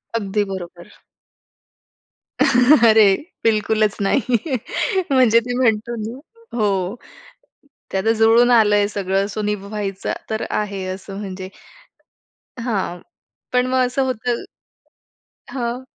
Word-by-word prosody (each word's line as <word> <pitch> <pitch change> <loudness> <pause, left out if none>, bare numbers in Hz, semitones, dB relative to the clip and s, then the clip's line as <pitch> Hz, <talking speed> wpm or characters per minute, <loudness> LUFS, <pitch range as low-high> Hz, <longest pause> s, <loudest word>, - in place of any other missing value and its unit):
अगदी 210 -1 0
बरोबर. 175 -2 -8 1.5
अरे! 235 -6 +6 0.3
बिलकुलच 215 -1 +2
नाही. 240 +5 +1 0.7
म्हणजे 250 -4 +5
ते 245 +1 -5
म्हणतो 235 -1 +1
ना 225 +4 -6 0.4
हो, 195 -2 0 1.0
ते 190 - 0
आता 220 +4 +2
जुळून 230 +2 +5
आलंय 210 -3 +4
सगळं 195 -1 -1
सो 210 +1 -4
निभावायचं 200 -1 -3 0.2
तर 220 0 -2
आहे 200 -2 -2
असं 190 +1 -7
म्हणजे 190 -2 -6 1.2
हां. 195 -6 -2 0.5
पण 250 0 +3
मग 255 0 +2
असं 250 +2 -1
होतं 245 -1 -2 1.1
हं. 245 -1 -3
215 Hz, 100 wpm, -20 LUFS, 195-240 Hz, 1.5 s, अरे